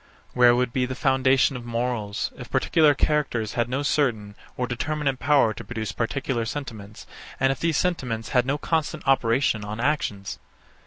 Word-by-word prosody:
Where 120 Hz, -1 st, +6 dB
would 125 Hz, -1 st, 0 dB
be 125 Hz, -1 st, +1 dB
the 130 Hz, -, -4 dB
foundation 130 Hz, -1 st, +3 dB
of 125 Hz, -, -6 dB
morals, 115 Hz, -3 st, -2 dB
if -, -, -10 dB
particular 155 Hz, -3 st, +3 dB
characters 135 Hz, -8 st, 0 dB
had 120 Hz, 0 st, 0 dB
no 135 Hz, +3 st, -1 dB
certain 120 Hz, -9 st, 0 dB, 0.2 s
or 125 Hz, -, 0 dB
determinate 135 Hz, +2 st, -2 dB
power 140 Hz, -5 st, +3 dB
to -, -, -9 dB
produce 110 Hz, -4 st, -4 dB
particular 120 Hz, +1 st, -2 dB
sentiments, 110 Hz, -5 st, -7 dB, 0.3 s
and 135 Hz, 0 st, +3 dB
if 135 Hz, -, -4 dB
these 165 Hz, -2 st, +1 dB
sentiments 125 Hz, -11 st, -1 dB
had 125 Hz, -2 st, +3 dB
no 140 Hz, +2 st, +1 dB
constant 155 Hz, -1 st, -2 dB
operation 130 Hz, -3 st, +2 dB
on 105 Hz, +2 st, -6 dB
actions? 115 Hz, -8 st, -2 dB
125 Hz, 165 wpm, -24 LUFS, 115-140 Hz, 0.3 s, Where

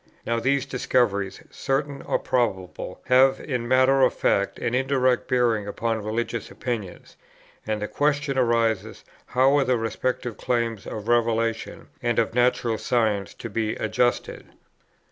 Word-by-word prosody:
Now 115 Hz, 0 st, 0 dB
these 135 Hz, +3 st, +1 dB
discoveries, 115 Hz, -7 st, 0 dB
certain 140 Hz, +1 st, -2 dB
or -, -, 0 dB
probable, 95 Hz, -8 st, -2 dB
have 130 Hz, +1 st, +5 dB
in 125 Hz, -4 st, -3 dB
matter 130 Hz, +2 st, +4 dB
of 130 Hz, -, +4 dB
fact 100 Hz, 0 st, +1 dB
an 120 Hz, -, -2 dB
indirect 130 Hz, -1 st, +1 dB
bearing 120 Hz, -5 st, +1 dB
upon 110 Hz, +1 st, -2 dB
religious 115 Hz, +2 st, -3 dB
opinions, 110 Hz, -8 st, -6 dB, 0.5 s
and 105 Hz, -1 st, -1 dB
the -, -, -2 dB
question 145 Hz, +1 st, 0 dB
arises 115 Hz, -4 st, 0 dB, 0.2 s
how 130 Hz, +2 st, +3 dB
are -, -, +3 dB
the 130 Hz, -2 st, +1 dB
respective 120 Hz, +1 st, -2 dB
claims 115 Hz, -4 st, -1 dB
of 105 Hz, 0 st, -6 dB
revelation 115 Hz, -1 st, 0 dB
and 120 Hz, -1 st, 0 dB
of 115 Hz, -1 st, +1 dB
natural 120 Hz, -2 st, +1 dB
science 110 Hz, -5 st, 0 dB
to -, -, -7 dB
be 110 Hz, -1 st, -2 dB
adjusted. 120 Hz, +2 st, -1 dB
120 Hz, 140 wpm, -24 LUFS, 110-130 Hz, 0.5 s, have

